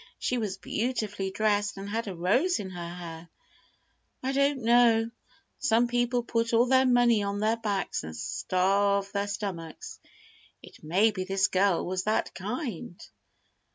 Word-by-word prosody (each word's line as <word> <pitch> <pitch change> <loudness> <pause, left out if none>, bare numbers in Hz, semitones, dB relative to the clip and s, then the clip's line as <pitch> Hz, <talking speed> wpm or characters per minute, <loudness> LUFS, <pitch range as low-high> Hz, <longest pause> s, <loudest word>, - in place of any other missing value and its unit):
"She 250 - -1
was 200 -4 -3
beautifully 205 -1 -2
dressed, 205 0 0
and 195 +1 -6
had 225 +2 -3
a 190 - -5
rose 245 - +2
in 190 -2 -6
her 175 -2 -6
hair." 170 -1 -9 0.9
"I 265 - 0
don't 280 -1 +1
know. 230 -1 +4 0.5
Some 240 -3 +3
people 245 0 0
put 230 0 -1
all 230 +2 +5
their 260 +1 +4
money 240 -3 +4
on 200 0 -2
their 220 +2 +1
backs, 205 -4 -2
and 80 0 -7
starve 195 - +1
their 200 0 -1
stomachs. 190 -6 -6 0.6
It - - -15
may 190 +8 +3
be 190 -3 -4
this 190 0 +1
girl 190 -1 +2
was 185 0 -2
that 215 +1 0
kind." 205 - -5
205 Hz, 155 wpm, -28 LUFS, 190-235 Hz, 0.9 s, all